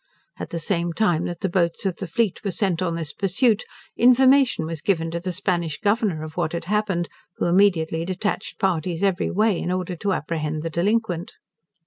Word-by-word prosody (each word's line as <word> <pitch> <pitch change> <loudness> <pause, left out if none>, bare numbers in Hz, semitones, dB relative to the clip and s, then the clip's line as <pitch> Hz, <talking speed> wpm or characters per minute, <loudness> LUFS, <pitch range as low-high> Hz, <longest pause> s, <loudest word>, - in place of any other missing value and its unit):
At - - -5
the 170 - -4
same 170 +1 -1
time 175 -5 +1
that 175 -1 -5
the 195 - +1
boats 170 0 0
of 185 -4 -1
the 190 - -5
fleet 220 +3 0
were 200 - -1
sent 185 -2 0
on 170 -2 0
this 160 -3 -4
pursuit, 210 +4 +1 0.3
information 255 - +5
was 160 -1 -5
given 165 -4 0
to 170 - -2
the 180 +2 -3
Spanish 175 -4 -1
Governor 205 -6 +1
of 155 0 -8
what 155 - -1
had 170 0 -3
happened, 195 -3 0 0.3
who - - 0
immediately 170 -3 +3
detached 190 +4 -3
parties 175 -1 -1
every 195 -3 +1
way 210 -2 +2
in 180 - -2
order 185 -1 -2
to 195 +3 0
apprehend 155 -1 -3
the 165 - -3
delinquent. 180 0 0
180 Hz, 190 wpm, -23 LUFS, 165-200 Hz, 0.3 s, information